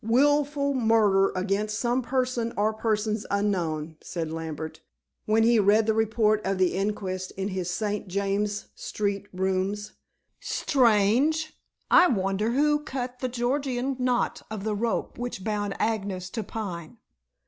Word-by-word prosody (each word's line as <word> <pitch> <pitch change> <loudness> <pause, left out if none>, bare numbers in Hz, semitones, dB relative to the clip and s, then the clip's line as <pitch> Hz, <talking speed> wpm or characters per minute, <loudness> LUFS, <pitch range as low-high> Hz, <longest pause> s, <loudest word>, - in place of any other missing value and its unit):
"Wilful 280 +4 +2
murder 220 -6 +3
against 205 +3 -1
some 245 +2 +1
person 250 -2 -1
or 215 +2 +2
persons 215 -1 -1
unknown," 170 -6 -1
said 165 -3 -4
Lambert, 160 -1 -5 0.5
when 220 +1 +4
he 230 0 +5
read 210 +2 +4
the 220 - +2
report 220 -1 +2
of 195 0 -1
the 185 -1 +2
inquest 190 -2 -2
in 195 +1 -2
his 185 -2 -3
St. 210 +2 -2
James's 200 +2 -1
Street 200 -1 -3
rooms. 190 +3 -1 0.5
"Strange. 260 +6 +2 0.4
I 360 - +8
wonder 200 - 0
who 295 +2 +3
cut 255 -4 -5
the 255 - -2
Gordian 255 +1 -1
knot 250 -1 0
of 215 -2 -5
the 215 0 -1
rope 230 +3 -2
which 245 -6 -4
bound 205 -1 -2
Agnes 195 -4 -2
to 225 - -3
Pine?" 195 -2 -6
215 Hz, 135 wpm, -26 LUFS, 195-240 Hz, 0.5 s, I